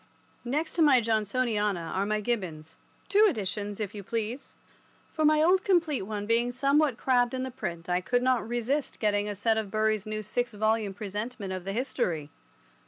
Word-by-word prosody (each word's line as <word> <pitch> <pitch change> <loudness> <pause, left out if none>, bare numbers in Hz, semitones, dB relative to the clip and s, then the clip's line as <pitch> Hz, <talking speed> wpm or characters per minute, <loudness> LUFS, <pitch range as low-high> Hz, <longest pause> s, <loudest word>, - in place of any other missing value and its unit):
IV. - - -35
Next 310 +4 -1
to 340 - 0
my 285 -5 +6
Johnsoniana 215 -4 0
are 195 +2 -1
my 215 0 0
Gibbons—two 205 - 0
editions, 205 - -3
if 210 -2 -3
you 205 - -6
please, 230 +5 -4 0.6
for 315 - -1
my 305 0 +5
old 370 +3 +4
complete 335 -7 +2
one 205 +1 -4
being 235 +2 +2
somewhat 275 +1 +2
crabbed 245 -1 +2
in 255 - -2
the 260 - -4
print 175 -9 -5
I 180 0 +1
could 245 +6 0
not 255 -3 +2
resist 245 +4 -1
getting 205 -1 +1
a 205 - -3
set 220 +3 +1
of 215 -2 -4
Bury's 215 0 0
new 215 0 -3
six 245 +3 -2
volume 215 -1 0
presentment 205 0 -5
of 185 -1 -6
the 195 - -3
History. 175 - -2
220 Hz, 180 wpm, -28 LUFS, 205-255 Hz, 0.6 s, my